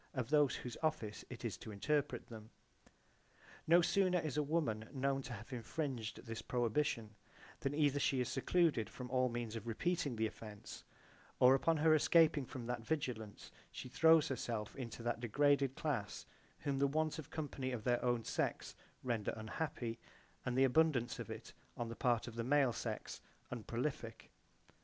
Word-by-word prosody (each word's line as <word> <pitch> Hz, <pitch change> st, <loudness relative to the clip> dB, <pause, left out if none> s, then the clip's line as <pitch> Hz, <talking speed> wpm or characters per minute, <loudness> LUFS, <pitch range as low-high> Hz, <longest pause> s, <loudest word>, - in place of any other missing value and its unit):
] -, -, -37 dB
of 130 Hz, 0 st, -2 dB
those 150 Hz, -3 st, +4 dB
whose 125 Hz, -, -6 dB
office 155 Hz, -10 st, -1 dB
it 120 Hz, -1 st, -7 dB
is 105 Hz, -6 st, -2 dB
to 110 Hz, -, -9 dB
interpret 145 Hz, +8 st, 0 dB
them. 110 Hz, -2 st, -10 dB, 0.4 s
J.B.) -, -, -25 dB, 0.8 s
No 170 Hz, +2 st, +7 dB
sooner 185 Hz, 0 st, +3 dB
is 155 Hz, -5 st, -2 dB
a 150 Hz, -, +2 dB
woman 140 Hz, -8 st, -1 dB
known 135 Hz, 0 st, 0 dB
to 130 Hz, -, -8 dB
have 110 Hz, +4 st, -8 dB
infringed 125 Hz, -1 st, -4 dB
this 115 Hz, -1 st, -5 dB
prohibition 120 Hz, -2 st, 0 dB, 0.5 s
than 135 Hz, +1 st, -1 dB
either 145 Hz, -2 st, +3 dB
she 135 Hz, -1 st, +2 dB
is 125 Hz, -, +1 dB
secluded 145 Hz, -4 st, +2 dB
from 125 Hz, -1 st, -8 dB
all 130 Hz, -1 st, +3 dB
means 115 Hz, -2 st, -4 dB
of 115 Hz, +1 st, -6 dB
repeating 150 Hz, +4 st, 0 dB
the 110 Hz, 0 st, +1 dB
offence, 105 Hz, -1 st, -8 dB, 0.6 s
or 125 Hz, +1 st, +8 dB
upon 160 Hz, +4 st, +3 dB
her 155 Hz, +1 st, +5 dB
escaping 155 Hz, -3 st, +5 dB
from 125 Hz, -3 st, -6 dB
that 120 Hz, 0 st, -2 dB
vigilance 115 Hz, -7 st, -3 dB, 0.2 s
she 125 Hz, -, -7 dB
throws 160 Hz, +3 st, +6 dB
herself 115 Hz, -4 st, -3 dB
into 115 Hz, -3 st, -6 dB
that 120 Hz, -1 st, -1 dB
degraded 140 Hz, +3 st, +2 dB
class 130 Hz, -10 st, -2 dB, 0.4 s
whom 140 Hz, -2 st, -1 dB
the 140 Hz, -, +4 dB
want 155 Hz, +2 st, 0 dB
of 155 Hz, -, -8 dB
company 140 Hz, -4 st, -3 dB
of 120 Hz, -4 st, -4 dB
their 120 Hz, +1 st, +1 dB
own 120 Hz, -2 st, +1 dB
sex -, -, -2 dB, 0.3 s
render 115 Hz, -5 st, -1 dB
unhappy, 115 Hz, 0 st, -3 dB, 0.4 s
and 125 Hz, 0 st, -1 dB
the 135 Hz, -, +6 dB
abundance 135 Hz, -3 st, +3 dB
of -, -, -5 dB
it -, -, -8 dB, 0.2 s
on 120 Hz, -1 st, -3 dB
the 115 Hz, -, -5 dB
part 120 Hz, -2 st, +1 dB
of 120 Hz, -, -6 dB
the 115 Hz, 0 st, -2 dB
male 135 Hz, -1 st, +3 dB
sex 115 Hz, -1 st, -5 dB, 0.3 s
unprolific. 120 Hz, -1 st, -4 dB
125 Hz, 175 wpm, -37 LUFS, 115-145 Hz, 0.8 s, or